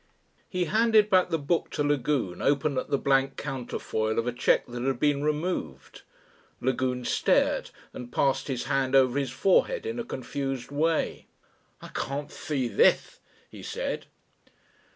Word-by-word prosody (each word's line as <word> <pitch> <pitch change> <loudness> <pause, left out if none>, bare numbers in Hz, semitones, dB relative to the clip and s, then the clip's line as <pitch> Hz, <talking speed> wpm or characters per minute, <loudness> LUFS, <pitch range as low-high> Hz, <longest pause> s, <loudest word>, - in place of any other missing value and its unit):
He 180 -1 -1
handed 215 +3 +3
back 185 -1 +4
the 165 - +1
book 160 +3 -1
to 145 - +1
Lagune, 140 -9 0
open 140 0 +1
at - - -6
the 140 - +2
blank 135 0 +1
counterfoil 120 -5 -3
of 115 - +1
a 125 - 0
cheque 120 - +2
that 120 0 -7
had 130 -1 -1
been 145 0 +2
removed. 150 - -3 0.6
Lagune 125 -1 -1
stared - - +2 0.2
and 120 -1 -8
passed 135 +1 +1
his 130 -3 -2
hand 135 -1 0
over 130 0 +4
his 135 -2 -2
forehead 195 - +2
in 230 +1 -3
a - - -2
confused 135 - -4
way. 160 +3 0 0.6
"I - - -9
can't 140 +2 -4
see 135 -5 -2
this," - - +2 0.3
he - - -10
said. - - -4
140 Hz, 150 wpm, -27 LUFS, 125-150 Hz, 0.6 s, back